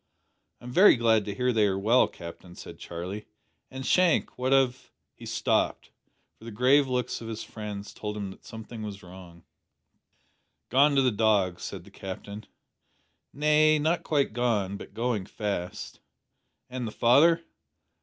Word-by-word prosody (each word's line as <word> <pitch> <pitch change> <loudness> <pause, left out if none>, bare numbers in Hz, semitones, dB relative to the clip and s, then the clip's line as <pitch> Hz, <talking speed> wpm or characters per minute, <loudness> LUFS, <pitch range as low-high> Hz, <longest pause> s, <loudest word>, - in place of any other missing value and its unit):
"I'm 125 - -9
very 185 +10 +7
glad 115 -3 +2
to 100 - -5
hear 125 +3 0
they 110 -2 +3
are 95 -1 -1
well, 115 +6 +4
Captain," 85 +1 -11
said - - -11
Charlie; 90 +5 -7 0.4
"and, 130 0 -7
Shank, 180 +1 +2
what 130 +1 -2
of 130 -2 +1
" - - -54
He - - -9
stopped, - - -1 0.5
for 115 - -14
the - - -6
grave 130 +6 +3
looks 125 -2 -2
of 115 - -7
his 110 -1 -5
friends 105 -2 -7
told 105 0 -5
him 100 -2 -5
that - - -15
something 110 0 -9
was 100 -3 -7
wrong. 90 -2 -13 1.3
"Gone 140 +3 +4
to 135 - +4
the 130 - +3
dogs," 100 -5 +1
said - - -6
the - - -17
Captain. 100 +2 -8 0.8
"Nay, 150 +1 +3
not 160 +3 0
quite 145 -7 0
gone 110 -5 0
but - - -11
going 115 -5 -2
fast." 100 -5 -5 0.7
"And 125 -2 -5
the - - -5
father?" 160 +10 +4
115 Hz, 160 wpm, -27 LUFS, 100-130 Hz, 1.3 s, very